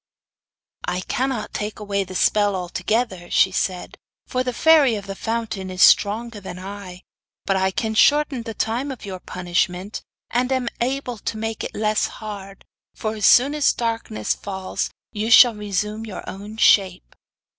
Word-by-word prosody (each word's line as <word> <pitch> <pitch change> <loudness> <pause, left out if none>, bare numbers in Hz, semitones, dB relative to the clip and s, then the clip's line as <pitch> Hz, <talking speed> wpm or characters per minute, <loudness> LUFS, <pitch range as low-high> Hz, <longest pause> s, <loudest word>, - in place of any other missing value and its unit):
'I 180 - -1
cannot 250 0 -2
take 210 0 -4
away 200 -1 -1
the 185 0 -10
spell 205 +1 +2
altogether,' 185 +1 -2
she 190 - +4
said, 185 -1 -3 0.3
'for 255 -1 -1
the 250 - -2
Fairy 290 -3 +5
of 200 -2 -6
the 195 - -5
Fountain 220 -3 -3
is 185 0 +2
stronger 220 +2 +4
than 185 -2 -8
I; 185 -1 -9 0.4
but 195 - +1
I 190 0 +2
can 220 +3 -2
shorten 290 +2 +3
the 225 -1 -7
time 240 +8 -1
of 255 -5 -8
your 190 -2 -6
punishment, 180 +2 -2 0.3
and 250 +2 0
am 255 -2 0
able 250 -2 -2
to 220 - -4
make 225 0 -4
it - - -6
less 215 0 +1
hard, 200 -2 -8 0.3
for 215 0 -3
as 210 -2 +2
soon 270 +4 +6
as 300 -1 +3
darkness 225 - -2
fall 190 -2 -7 0.3
you 215 +1 -2
shall 245 0 +8
resume 210 +1 -3
your 200 - -8
own 205 +3 -8
shape. 190 -4 +3
210 Hz, 165 wpm, -22 LUFS, 190-235 Hz, 0.4 s, shall